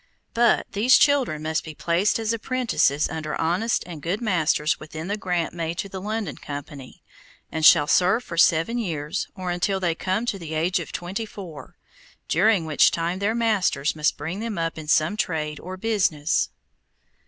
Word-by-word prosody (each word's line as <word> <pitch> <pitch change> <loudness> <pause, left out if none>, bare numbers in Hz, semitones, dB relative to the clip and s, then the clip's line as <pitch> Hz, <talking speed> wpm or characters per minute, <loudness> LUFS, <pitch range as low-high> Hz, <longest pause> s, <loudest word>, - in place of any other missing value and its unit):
But, 235 -1 +3
these 230 +6 +5
children 260 - +2
must 160 0 -1
be 155 -1 -9
placed 175 +7 +1
as 225 0 -1
apprentices 230 - +1
under 155 0 -4
honest 180 +8 0
and 165 -4 -9
good 180 +7 -2
masters 160 -8 +1
within 155 +3 -7
the 205 - 0
grant 180 -5 -2
made 165 -1 -4
to 200 - -4
the 190 -1 -7
London 215 +1 -3
Company, 145 -2 -9 0.5
and 160 - -3
shall 155 -1 +7
serve 185 +9 +3
for 170 - -7
seven 165 +8 +3
years, 165 -4 -3
or 185 -2 -4
until 190 +2 0
they 175 -3 0
come 190 +7 -2
to 200 -5 -2
the 160 -2 -6
age 170 +4 +1
of - - -7
twenty 190 +6 -4
four, 180 -8 -10 0.5
during 215 -6 +3
which 155 -2 +4
time 170 +2 -2
their 205 +3 0
masters 200 -11 +1
must 150 -1 +1
bring 165 +7 -5
them 225 -3 -4
up 165 0 -2
in 155 - -9
some 155 +6 +2
trade 150 -6 -2
or 185 +1 -7
business. 185 -8 +1
175 Hz, 175 wpm, -24 LUFS, 155-210 Hz, 0.5 s, shall